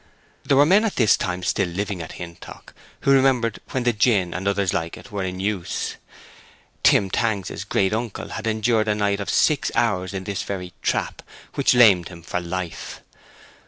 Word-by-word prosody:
There 140 - +2
were 145 - +7
men 195 +7 +5
at 220 - -1
this 110 -4 +4
time 90 0 -3
still 95 +1 +1
living 95 +1 -3
at 80 - -8
Hintock 85 -1 -10 0.3
who 140 - +2
remembered 130 -5 +3
when 130 - -2
the 120 -1 +2
gin 105 -5 +2
and 95 +2 -3
others 100 -2 +1
like 80 0 -3
it 125 - -14
were 100 -2 -3
in 90 0 -4
use. 95 -2 -2 0.9
Tim 95 -2 +4
Tangs's 105 -4 -1
great 95 +1 0
uncle 115 -1 -4
had 110 0 -5
endured 110 0 +1
a 105 - +2
night 100 -1 0
of 100 - -4
six 150 -3 +2
hours 100 -7 0
in 95 - -4
this 100 0 -3
very 90 -3 -5
trap, - - -1 0.3
which - - +2
lamed 100 -8 +6
him 85 -2 -12
for 90 - -3
life. 90 0 -6
100 Hz, 185 wpm, -23 LUFS, 90-115 Hz, 0.9 s, were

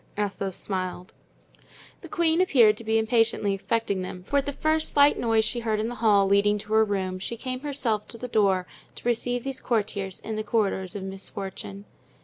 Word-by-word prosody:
Athos 200 -2 -2
smiled. 185 -2 -2 0.9
The - - -9
queen 335 0 +2
appeared 240 -12 +5
to 230 - -8
be 220 0 +1
impatiently 225 -2 +2
expecting 200 0 -1
them, 185 0 -7
for 285 - 0
at 280 - 0
the - - 0
first 310 +2 0
slight 285 0 +5
noise 225 -2 +2
she 240 - -1
heard 220 -2 -1
in 220 +2 -1
the - - -5
hall 205 -3 +5
leading 200 +1 +3
to 210 +1 -6
her 220 0 +6
room 190 -3 -2
she 230 +5 -4
came 255 +1 -4
herself 260 -7 -1
to 230 - -9
the 250 - -6
door 195 -5 +2 0.3
to - - -7
receive 245 +1 0
these 270 -1 -4
courtiers 200 -5 -2
in 220 -1 -5
the 215 - -2
corridors 200 -5 -1
of 200 - -4
Misfortune. 195 +1 -7
215 Hz, 195 wpm, -26 LUFS, 195-240 Hz, 0.9 s, her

